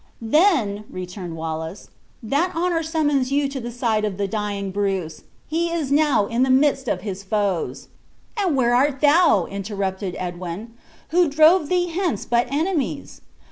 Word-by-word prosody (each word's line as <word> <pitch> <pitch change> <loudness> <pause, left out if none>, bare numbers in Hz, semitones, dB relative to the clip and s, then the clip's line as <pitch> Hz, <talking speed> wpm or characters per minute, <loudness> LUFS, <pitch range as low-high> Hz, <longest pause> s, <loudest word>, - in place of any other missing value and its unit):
"Then," 230 - +2
returned 180 -1 -7
Wallace, 160 +3 -5 0.3
"that 290 +11 0
honor 340 0 +1
summons 295 -5 0
you 285 0 +2
to 275 -1 -5
the 240 -1 -5
side 230 -3 0
of 205 -3 -2
the 200 -1 -1
dying 200 -1 -3
Bruce. 190 -4 -2 0.2
He 335 +2 0
is 325 -5 -2
now 290 -7 +3
in 230 +4 -1
the 260 - +3
midst 270 0 +3
of - - -1
his 195 -2 -5
foes." 195 - -2 0.5
"And 385 -8 0
where 240 -2 +3
art 275 +2 +2
thou?" 300 - +5
interrupted 195 -2 -4
Edwin; 180 +4 -6 0.4
"who 345 0 +3
drove 310 +2 +5
thee 355 -1 +1
hence 340 - -2
but 240 0 +1
enemies? 315 +1 -2
240 Hz, 155 wpm, -22 LUFS, 200-310 Hz, 0.5 s, thou